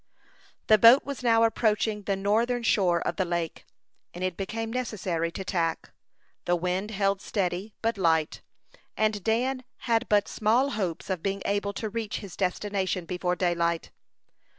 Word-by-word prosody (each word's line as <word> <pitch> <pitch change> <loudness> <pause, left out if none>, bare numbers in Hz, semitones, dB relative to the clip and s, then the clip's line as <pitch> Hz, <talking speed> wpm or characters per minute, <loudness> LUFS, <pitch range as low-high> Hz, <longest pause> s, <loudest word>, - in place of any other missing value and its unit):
The 215 -1 +5
boat 235 +5 +8
was 280 -2 -5
now 230 -2 +4
approaching 220 -1 +1
the 200 0 -1
northern 230 +5 +1
shore 180 -6 +2
of 170 - -2
the 190 - +2
lake, 170 -2 -3 0.5
and 180 - -5
it 185 -2 -1
became 225 +4 -4
necessary 185 -9 -2
to 190 - -5
tack. 165 -3 -1 0.5
The 175 - +2
wind 180 +4 -2
held 195 -2 0
steady, 195 +1 -2
but 225 -2 0
light; 160 -3 +1 0.6
and 215 -2 +1
Dan 255 +4 0 0.2
had 230 0 0
but 205 -1 +3
small 240 +6 +2
hopes 190 -5 -3
of 185 -3 -2
being 195 +1 -2
able 200 0 -1
to 220 - -3
reach 215 0 -3
his 195 -5 -9
destination 190 -1 -1
before 180 +1 -1
daylight. 170 -2 0
200 Hz, 155 wpm, -27 LUFS, 180-225 Hz, 0.6 s, boat